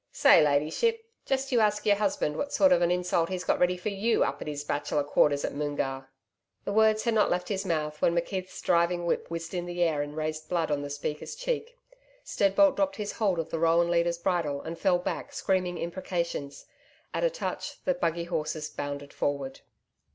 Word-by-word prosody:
Say, - - +6
Ladyship, 155 - +1 0.2
just 270 0 -1
you 245 - +4
ask 210 -1 +2
your 205 -1 +4
husband 195 -7 0
what 285 - -2
a - - -17
sort 285 -1 +4
of 270 - +5
an 170 - +3
insult 180 -2 +1
he's 185 -1 -3
got - - +1
ready 180 0 +2
for 180 +4 -3
YOU 210 +3 +1
up - - -2
at - - -6
his 145 -1 -4
Bachelor's 145 0 -1
Quarters 145 -1 +3
at - - -3
Moongarr.' 135 -2 -3 0.6
The 200 - -2
words 220 0 +4
had 235 - +1
not 215 -1 +3
left 180 0 -1
his 195 -1 -2
mouth 150 -3 -2
when 170 - +3
McKeith's 185 +2 -3
driving 175 0 +2
whip 170 - -1
whizzed 165 0 -5
in 175 -1 -3
the 175 0 0
air 155 -4 +1
and 145 +1 -6
raised 155 0 -3
blood 165 -3 0
on 145 -1 0
the 145 - -5
speaker's 145 +1 -4
cheek. - - -3 0.5
Steadbolt 205 +10 +3
dropped 290 -1 +1
his 210 -1 -4
hold 200 -5 0
of 165 - -3
the 165 - -2
roan 170 +1 +3
leader's 170 0 +2
bridle 170 -5 -1
and 165 +1 -6
fell 185 -3 +3
back 175 - -4
screaming 185 -2 0
imprecations. 170 -5 -4 0.5
At - - -1
a - - +4
touch, - - -5
the 275 - +3
buggy 170 -10 -1
horses 155 -2 -3
bounded 145 0 -5
forward. 140 -2 -2
170 Hz, 205 wpm, -28 LUFS, 150-200 Hz, 0.6 s, Say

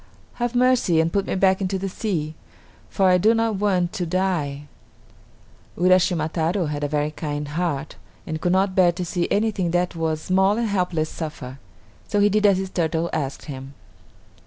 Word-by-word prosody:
Have 240 0 -1
mercy 245 -9 +3
and 165 +1 +1
put 200 -1 0
me - - -1
back 190 0 +3
into 190 0 -1
the 195 +1 -3
sea, 180 -6 -3 0.6
for 195 - +1
I 180 0 +5
do 220 +5 +4
not 225 -2 0
want 185 -4 +1
to 175 - -3
die." 165 -6 -1 1.1
Uraschima 180 -2 +3
Taro 170 +3 -1
had 150 -1 -3
a - - +1
very 150 +1 -1
kind 150 -1 -4
heart 155 -2 -3 0.3
and 155 0 -4
could 175 - +1
not 190 +1 +2
bear 185 -2 +4
to 180 +1 -4
see 175 0 -1
anything 205 -4 0
that 175 +1 0
was 160 -1 -1
small 190 +3 +2
and 235 -1 0
helpless 180 -5 0
suffer; 140 -5 -7 0.5
so 205 - 0
he 205 0 +5
did 210 +1 +3
as 195 -2 +4
the 190 0 -2
turtle 165 -2 -1
asked 140 -3 -3
him. 135 -1 -8
180 Hz, 185 wpm, -23 LUFS, 155-195 Hz, 1.1 s, I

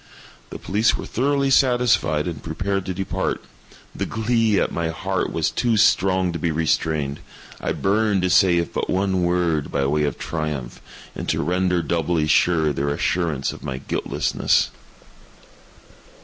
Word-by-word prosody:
The - - -7
police 105 +3 +1
were - - -6
thoroughly 140 +2 0
satisfied 120 - +3
and 80 -5 -5
prepared 95 +4 -3
to 95 - -2
depart. 95 +1 -2 0.5
The - - -3
glee 110 -2 +1
at - - 0
my 85 -1 -2
heart 95 +3 -2
was 80 - 0
too 120 -3 +1
strong 95 -3 +3
to 85 - -4
be 85 - 0
restrained. 80 -2 0 0.4
I - - -2
burned 100 -1 +1
to 90 - +1
say 90 0 +5
if 85 -1 -2
but - - -2
one 95 -1 +1
word, 85 -4 0
by 70 - 0
way 75 +2 +1
of 70 - -3
triumph, 75 -6 -4 0.3
and - - -5
to - - 0
render 90 +1 +1
doubly 80 0 0
sure 80 -1 +3
their 70 +1 -1
assurance 75 -1 -1
of - - -12
my 65 - -4
guiltlessness. 65 - 0
90 Hz, 155 wpm, -22 LUFS, 80-100 Hz, 0.5 s, say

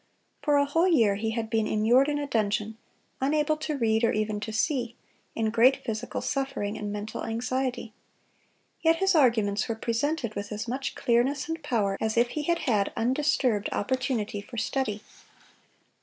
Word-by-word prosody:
For 295 -2 +3
a 285 - +4
whole 330 +5 +2
year 235 - +4
he 215 +3 -2
had 225 0 -2
been 220 -1 0
immured 240 +6 +3
in 290 - 0
a 290 - -2
dungeon, 215 -3 -1 0.5
unable 300 +3 +2
to 305 -1 -3
read 225 -2 +1
or 230 - +4
even 215 0 -1
to 215 +1 -5
see, 240 +1 -1 0.4
in 220 -1 0
great 245 +4 +4
physical 225 0 -3
suffering 270 -7 -2
and 210 -1 -4
mental 210 +1 -5
anxiety. 245 0 -2 0.9
Yet 325 0 +4
his 385 +3 +2
arguments 220 -9 +3
were 230 - -1
presented 235 +2 -1
with 200 0 -5
as 215 +3 -4
much 265 +3 -3
clearness 255 +3 +1
and 325 0 -4
power 210 -9 0
as 220 +1 -1
if 240 +1 +4
he 305 - -3
had 340 +3 0
had 210 -7 +1
undisturbed 250 -3 +1
opportunity 250 -4 -1
for 235 +4 -11
study. 220 -3 -2
235 Hz, 170 wpm, -27 LUFS, 215-275 Hz, 0.9 s, a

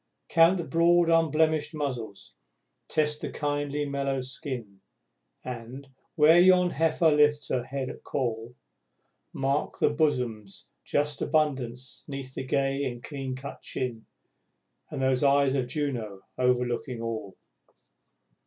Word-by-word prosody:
Count 165 +2 +5
the 170 - -2
broad 170 +3 +3
unblemished 160 -1 +2
muzzles, 125 -9 -5 0.5
test 150 -1 0
the - - -3
kindly 145 0 -2
mellow 140 -1 -1
skin 125 -6 -6 0.6
And, 125 +3 -7 0.3
where 160 +2 +6
yon 180 0 +5
heifer 160 0 +2
lifts 150 -1 +3
her 125 -2 0
head 135 0 -4
at - - -8
call, 120 -2 -3 0.8
Mark 135 +2 -1
the - - +3
bosom's 125 -10 -1
just 145 - -1
abundance 130 -5 -1
'neath 135 -2 -6
the 130 - -4
gay 135 +1 0
and 120 -3 -4
cleancut 135 -1 -6
chin, 120 -4 -4 0.8
And 135 - -3
those 130 0 +2
eyes 140 -1 +4
of 130 -3 0
Juno, 125 -8 -3
overlooking 125 0 0
all! 110 -4 -5
140 Hz, 120 wpm, -27 LUFS, 125-150 Hz, 0.8 s, where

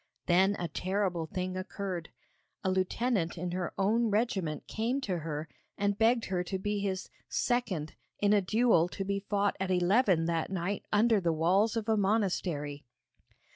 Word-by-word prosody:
Then 190 +3 +4
a 175 - -2
terrible 185 -3 -1
thing 185 +1 -3
occurred. 185 -2 -4 0.5
A 190 - +1
lieutenant 185 -1 0
in 175 +1 -3
her 180 -1 -2
own 225 +4 +2
regiment 195 - -1
came 235 +5 -1
to 185 -8 -2
her 155 -1 -4 0.3
and 200 0 +1
begged 230 +2 +3
her 180 -2 -1
to 190 +2 -3
be 205 +2 -2
his 190 -2 -3 0.2
'second' 210 -11 -1 0.3
in 205 0 +3
a 205 - +4
duel 205 -4 +3
to 195 - -4
be 200 0 -1
fought 200 0 0
at 190 0 -2
eleven 185 -1 +3
that 165 -1 -1
night 190 +1 -3
under 215 0 +4
the 170 -2 +2
walls 190 +8 +2
of 220 -1 -3
a 220 -1 +3
monastery. 180 -8 0
190 Hz, 165 wpm, -30 LUFS, 175-210 Hz, 0.5 s, Then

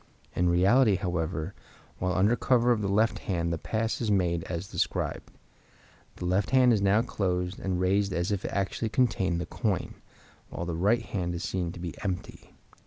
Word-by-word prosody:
In 90 0 +2
reality, 100 +6 +4
however, 85 -1 -2 0.5
while 90 0 0
under 105 +5 +4
cover 125 -1 +3
of 115 -3 +2
the 100 - -1
left 105 +1 +2
hand 85 -3 -1
the 80 - -3
pass 110 +1 -2
is 115 - -1
made 85 -4 +1
as 85 +1 -4
described. - - -2 0.9
The - - -6
left 95 +2 +1
hand 125 -2 +5
is 105 - +1
now 100 +3 +3
closed 90 -5 -2
and 95 -2 -2
raised 100 +2 +2
as 85 +1 -1
if 100 -2 -1
it - - -2
actually 100 +3 -1
contained 100 -8 +1
the 85 - -3
coin, 100 -7 -2 0.6
while 85 - -5
the 85 - -3
right 105 +7 +2
hand 85 -5 -3
is 85 - -4
seen 90 -3 -2
to 90 - -10
be 85 -2 -5
empty. 95 -2 -5
95 Hz, 185 wpm, -28 LUFS, 90-105 Hz, 0.9 s, hand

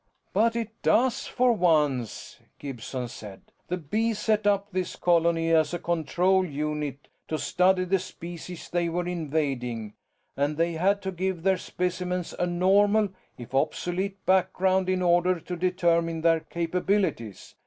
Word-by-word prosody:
"But 230 +1 +3
it 230 -1 -2
does, 250 +1 +2
for 250 -1 +2
once," 150 - 0 0.2
Gibson 130 -2 -5
said. 105 -5 -10 0.2
"The 180 - -2
Bees 215 +8 -1
set 210 -1 +1
up 200 0 +2
this 185 -1 -2
colony 165 -1 +2
as 160 0 +3
a - - -1
control 175 +3 +1
unit 150 -3 -4 0.2
to 155 - -2
study 185 +3 +2
the 190 +1 +2
species 175 0 -8
they 175 -1 0
were 175 +1 -2
invading, 135 -10 -2 0.4
and 145 +2 0
they 170 +1 +1
had 195 +5 +1
to 190 - -2
give 185 -1 -3
their 190 0 +3
specimens 180 -1 -3
a 180 - +1
normal 200 +4 +3 0.3
if 120 +1 -10
obsolete 180 +7 -1
background 185 0 +2
in 185 -1 +1
order 175 0 +3
to 180 +2 -6
determine 170 -2 +1
their 165 0 +4
capabilities. 170 - -2
175 Hz, 145 wpm, -26 LUFS, 160-190 Hz, 0.4 s, their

